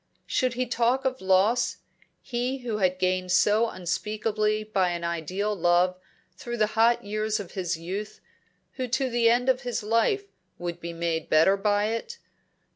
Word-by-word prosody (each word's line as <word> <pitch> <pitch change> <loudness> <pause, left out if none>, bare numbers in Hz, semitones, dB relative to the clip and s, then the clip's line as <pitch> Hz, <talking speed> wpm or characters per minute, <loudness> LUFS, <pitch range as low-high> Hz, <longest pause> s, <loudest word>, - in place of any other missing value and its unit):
Should 255 -2 0
he 255 +1 0
talk 245 +2 +1
of 260 0 -1
loss 190 +5 +2 0.5
he 250 +1 -3
who 225 -3 -1
had 185 -2 +2
gained 185 0 0
so 215 +5 +3
unspeakably 215 +3 -1
by 195 -4 +1
an 170 0 -5
ideal 180 +5 -2
love 175 0 +3 0.4
through 240 +5 -6
the 215 - +3
hot 230 +2 +3
years 215 +1 -1
of 195 -4 -7
his 180 -3 -2
youth, 190 +6 -6 0.6
who 255 -1 -2
to 255 +1 0
the 235 -1 +3
end 245 +2 +2
of 260 0 +2
his 245 -4 -3
life 230 - +2 0.3
would 175 0 -5
be 170 0 -6
made 165 -1 -2
better 165 +5 +5
by 205 +1 +1
it? 230 - -4
210 Hz, 165 wpm, -26 LUFS, 185-240 Hz, 0.6 s, better